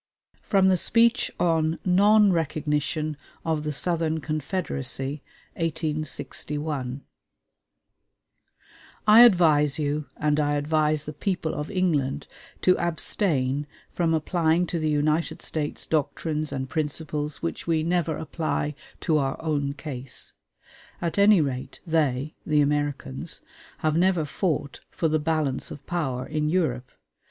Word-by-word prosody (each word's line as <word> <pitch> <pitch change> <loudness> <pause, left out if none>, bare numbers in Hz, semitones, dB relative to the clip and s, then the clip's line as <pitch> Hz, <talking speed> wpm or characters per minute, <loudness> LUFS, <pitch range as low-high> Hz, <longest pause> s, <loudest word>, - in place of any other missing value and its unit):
FROM 195 -2 +3
THE 185 - +4
SPEECH 230 +6 +3
ON 165 -2 +2
NON 205 +2 +5
RECOGNITION 155 -1 -1 0.3
OF 160 -2 0
THE 150 - -2
SOUTHERN 160 +1 0
CONFEDERACY 145 -3 -3 0.4
(1861) 150 -3 -3 2.0
I 215 +1 +8
advise 155 - +5
you, 150 -1 -1
and 150 0 +1
I 145 -1 +1
advise 150 0 +1
the 150 - -6
people 165 0 -2
of 150 - -4
England, 150 -8 0 0.4
to 185 - +5
abstain 150 -5 0 0.2
from 165 -2 +1
applying 165 +1 +1
to 170 -1 -3
the 155 -1 0
United 150 +2 0
States 150 -2 -3
doctrines 155 0 -1
and 130 -1 -3
principles 150 0 -3
which 165 - -4
we 160 -2 +2
never 165 -2 0
apply 155 -1 -2 0.3
to 155 -3 +2
our 135 -1 -1
own 145 -3 -1
case. 135 -3 -4 0.7
At 170 +3 -2
any 200 -3 +6
rate, 130 -2 -4
they 155 -4 0
[the 150 -1 +3
Americans] 145 - -2 0.4
have 155 0 +2
never 175 -2 +3
fought 150 -3 -2
"for 165 - -1
the 155 0 +1
balance 150 -3 -1
of 140 - -10
power" 135 -8 -2
in 150 0 -1
Europe. 130 -8 0
155 Hz, 125 wpm, -25 LUFS, 145-165 Hz, 2.0 s, I